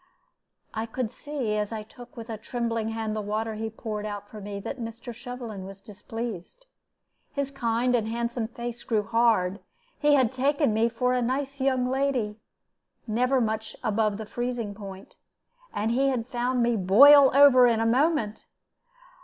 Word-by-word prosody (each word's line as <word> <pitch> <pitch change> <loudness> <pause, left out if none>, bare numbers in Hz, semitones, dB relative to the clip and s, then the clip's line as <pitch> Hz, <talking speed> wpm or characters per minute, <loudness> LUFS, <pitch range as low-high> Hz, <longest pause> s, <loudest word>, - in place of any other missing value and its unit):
I 220 +1 -3
could 230 -1 -3
see, 260 -6 -3
as 210 0 -2
I 220 -1 -4
took 240 +3 -15
with 230 -1 -7
a - - -3
trembling 230 -1 -2
hand 225 -1 -3
the 215 - -2
water 215 +2 -2
he 220 +1 -4
poured 215 -1 -5
out 205 -1 -5
for 215 0 -10
me, 200 0 -6
that 265 +6 -6
Mr. 230 +2 -7
Shovelin 235 -4 -7
was 195 +1 -10
displeased. 225 - -7 0.7
His 280 -1 -2
kind 245 -1 0
and 220 -2 0
handsome 235 0 -2
face 235 0 -6
grew 215 -2 0
hard. 220 -4 +2 0.4
He 295 -1 +4
had 255 -4 +3
taken 275 -1 +1
me 225 +2 +2
for 250 +2 0
a 250 - +1
nice 270 +3 -2
young 260 -2 +2
lady, 255 -5 -1 0.7
never 250 +4 +1
much 220 -1 -2
above 215 -1 +1
the 220 - -6
freezing 240 -2 -3
point, 195 -2 -10 0.5
and 215 +2 -1
he 270 +3 +2
had 250 -4 0
found 245 0 0
me 235 0 +2
boil 270 +9 +8
over 270 -3 +8
in 230 -2 +2
a 225 - +1
moment. 245 -2 +1
230 Hz, 170 wpm, -26 LUFS, 215-255 Hz, 0.7 s, boil